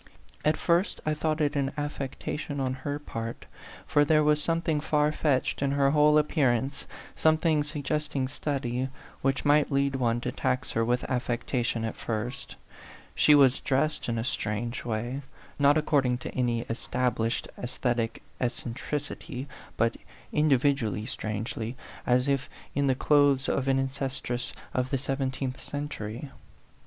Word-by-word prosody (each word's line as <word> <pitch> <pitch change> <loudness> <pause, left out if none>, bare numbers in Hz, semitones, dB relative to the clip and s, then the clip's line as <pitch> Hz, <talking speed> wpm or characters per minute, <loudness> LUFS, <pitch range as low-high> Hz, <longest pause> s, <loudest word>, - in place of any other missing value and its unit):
At 155 0 +3
first 175 +3 +1
I 155 - +2
thought 155 +1 0
it 145 0 +1
an 140 -1 0
affec 145 -2 -3
tation 145 -1 -4
on 130 -1 0
her 145 0 -2
part 115 -6 -6 0.4
for 145 - +4
there 155 +1 +4
was 150 0 +3
something 165 -2 0
far 150 -1 +2
fetched 145 -4 0
in 140 -1 +1
her 140 -1 +3
whole 150 0 +5
appearance, 135 -3 +1 0.3
some 155 0 +4
thing 155 -2 +2
suggesting 150 -2 -2
study, 130 -2 -2 0.3
which 135 +1 0
might 145 0 +4
lead 140 0 +2
one 120 -2 +1
to - - -2
tax 130 +1 0
her 115 - +1
with 120 +2 +1
affectation 120 -2 -1
at 110 - -3
first; 120 +3 -4 0.6
she 150 - +6
was 135 -3 +6
dressed 140 +1 0
in 115 - 0
a 115 - -1
strange 115 0 -2
way 120 +4 -2 0.4
not 145 +1 +5
according 135 -5 +2
to - - -7
any 120 -2 +1
established 120 0 -1
aesthetic 120 -2 -1 0.2
eccentricity, 130 +3 -3 0.3
but 115 0 +2 0.4
individually 135 -7 +2
strangely, 110 +3 -3 0.3
as 125 +2 +3
if 140 -2 0 0.2
in 140 0 +1
the 130 - +3
clothes 145 -1 +4
of 135 - 0
an 135 0 +3
ancestress 135 -2 -2 0.2
of 125 0 0
the 135 - +1
seventeenth 130 -1 -2
century. 135 -3 -5
135 Hz, 145 wpm, -28 LUFS, 125-145 Hz, 0.6 s, she